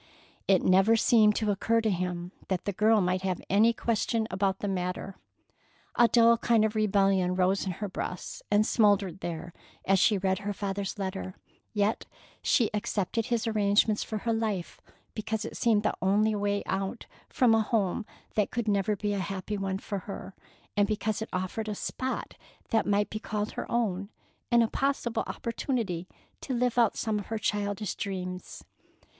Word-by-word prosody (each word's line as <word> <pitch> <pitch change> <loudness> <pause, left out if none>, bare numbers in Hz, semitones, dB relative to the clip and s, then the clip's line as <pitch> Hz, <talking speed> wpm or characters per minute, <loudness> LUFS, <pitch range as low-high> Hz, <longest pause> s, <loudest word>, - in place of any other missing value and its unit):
It 195 -2 +4
never 195 +5 +5
seemed 215 -2 +5
to 215 -2 +1
occur 225 +3 +1
to 220 -1 +1
him 180 -1 -3 0.2
that 185 -2 -2
the 205 - -1
girl 215 +2 +4
might 185 0 0
have 185 -2 -1
any 215 +4 +5
question 230 -1 0
about 190 +1 0
the 205 - -4
matter. 180 0 -3 0.8
A 240 - +5
dull 230 0 +5
kind 230 -3 +3
of 215 - -1
rebellion 195 -4 +2
rose 190 +2 +1
in 185 - -1
her 205 +4 -4
breast 180 -1 -5
and 210 +1 +4
smouldered 200 -5 +2
there 170 -1 -5 0.3
as 195 0 +4
she 210 +2 +4
read 190 0 0
her 205 0 -3
father's 200 0 -3
letter; 190 -1 -4 0.4
yet 205 0 0 0.3
she 235 -4 +2
accepted 210 +1 -1
his 235 -2 0
arrangements 210 -1 +2
for 220 - -4
her 230 +2 -1
life, 215 -6 -2 0.3
because 220 0 -3
it - - -7
seemed 220 -3 +2
the - - +1
only 210 +3 +3
way 205 -1 0
out 195 +4 -3 0.2
from 245 -3 +4
a 225 - +4
home 215 -1 0 0.3
that 210 -2 +1
could 235 -1 -3
never 205 0 +2
be 205 +1 -2
a 200 - -1
happy 195 +2 -3
one 195 -1 -2
for 200 0 -4
her; 195 0 -8 0.4
and 205 0 +3
because 215 0 -1
it 220 - -4
offered 185 +4 -3
a 210 - -2
spot 260 +5 -4 0.4
that 225 - +2
might 205 0 +1
be 215 - -3
called 210 -1 -3
her - - -6
own, 200 -5 0 0.4
and 235 -1 +6
a - - +2
possible 250 -3 -1
opportunity 230 -8 -3 0.3
to 260 - -3
live 245 0 +1
out 230 -3 +3
some 215 -2 -1
of 200 - -8
her 225 - -2
childish 205 -1 -1
dreams. 185 -2 -5
205 Hz, 175 wpm, -28 LUFS, 190-220 Hz, 0.8 s, and